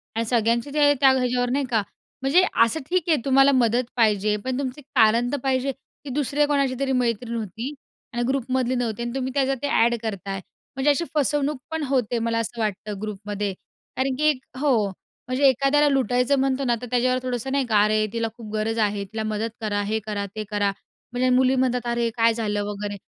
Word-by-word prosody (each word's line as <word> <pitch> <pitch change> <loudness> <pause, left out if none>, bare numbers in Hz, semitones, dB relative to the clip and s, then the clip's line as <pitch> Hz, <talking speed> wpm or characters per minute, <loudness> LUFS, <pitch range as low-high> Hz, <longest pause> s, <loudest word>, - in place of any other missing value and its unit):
आणि 230 - 0
सगळ्यांचे 235 +3 +1
ते 290 -1 +5
त्या 270 - +7
ह्याच्यावर 250 -1 +1
नाही 275 +1 0
का 225 -4 +2 0.4
म्हणजे 280 +8 +4 0.2
असं 230 +8 0
ठीक 365 -1 +2
आहे 315 - +4
तुम्हाला 270 +1 +5
मदत 240 0 +3
पाहिजे. 210 -2 +2
पण 255 +5 -3
तुमचं 270 +1 -4
कारण 230 +3 +4
तर 285 - 0
पाहिजे, 265 0 +1
की 270 +1 -15
दुसऱ्या 290 +1 +1
कोणाची 275 -3 +1
तरी 275 -1 0
मैत्रीण 235 -2 0
होती 225 +5 -5 0.4
आणि 240 0 -1
ग्रुपमधली 260 -1 0
नव्हती 235 -2 -2
आणि 240 - -3
तुम्ही 260 -1 -2
त्याचं 270 -1 +1
ते 285 - -1
अ‍ॅड 235 -3 +3
करताय. 200 -3 -4 0.4
म्हणजे 270 +2 +2
अशी 315 +4 0
फसवणूक 295 0 +1
पण 320 -1 -2
होते 245 -3 0
मला 230 0 0
असं 230 +1 -4
वाटतं 210 -1 -3
ग्रुपमध्ये. 205 -1 -4 0.4
कारण 260 0 0
की 305 0 +5 0.3
हो, 250 -8 +2 0.4
म्हणजे 260 +2 +3
एखाद्याला 275 +3 +3
लुटायचं 260 0 +2
म्हणतो 270 0 0
ना 240 -1 +2
तर 245 - -6
त्याच्यावर 255 +1 +2
थोडंसं 255 0 -3
नाही 275 -1 +1
का 215 -4 +3
अरे, 215 0 +2
तिला 230 -1 -1
खूप 220 -3 -9
गरज 225 +1 -1
आहे. 205 -2 0
तिला 220 +2 -5
मदत 215 +1 -2
करा. 205 -2 -1
हे 215 +2 -1
करा, 205 -2 -3
ते 215 - -3
करा. 205 -1 +1 0.4
म्हणजे 250 +1 +1
मुली 260 0 +3
म्हणतात 250 -1 0
अरे, 235 -1 0
काय 230 0 +4
झालं 210 -2 -1
वगैरे. 205 0 -5
245 Hz, 195 wpm, -24 LUFS, 220-270 Hz, 0.4 s, त्या